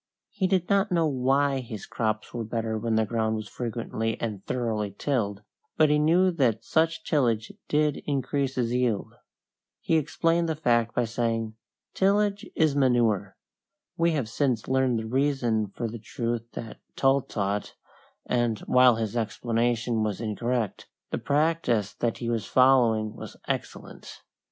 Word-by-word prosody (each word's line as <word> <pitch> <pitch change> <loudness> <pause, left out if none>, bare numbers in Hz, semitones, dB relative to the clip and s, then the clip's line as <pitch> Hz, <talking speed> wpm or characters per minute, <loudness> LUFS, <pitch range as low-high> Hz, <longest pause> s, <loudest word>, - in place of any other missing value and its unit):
He 200 -2 0
did 185 -2 +1
not 200 0 +2
know 170 -2 +3
why 135 0 +2
his 115 -5 -7
crops 110 -2 -2
were 120 -2 -3
better 110 0 -2
when 110 +1 -1
the 110 0 +3
ground 110 0 0
was 110 -1 -5
frequently 115 -1 -3
and 105 -4 -4
thoroughly 110 -5 -2
tilled, 105 -8 -1 0.3
but 155 -1 +5
he 150 - +3
knew 175 +5 +4
that 120 -9 +1
such 165 +1 +1
tillage 115 -7 +1 0.2
did 150 -1 +2
increase 140 -1 -1
his 120 -2 0
yield. 125 -5 0 0.7
He 165 - +1
explained 165 +3 +1
the 160 - 0
fact 120 -6 +1
by 120 - +2
saying, 115 -1 -1 0.4
"Tillage 200 +1 +1
is 155 -3 +2
manure." 115 -8 +2 0.6
We 170 0 +2
have 140 -7 -1
since 120 -1 -1
learned 130 -2 +2
the 110 - -3
reason 120 -3 +1
for 115 +4 -4
the 115 +1 -7
truth 115 +1 -3
that 115 - -7 0.2
Tull 135 +1 +3
taught, 100 -3 -3 0.5
and, 120 -3 +1
while 125 -1 +5
his 110 0 -3
explanation 115 +1 0
was 105 -2 -1
incorrect, 115 0 -2 0.2
the - - -1
practice 145 -8 +1
that 120 -2 -2
he 120 - -5
was 115 -3 -1
following 120 -5 +4
was - - -9
excellent. - - -6
120 Hz, 150 wpm, -26 LUFS, 110-145 Hz, 0.7 s, but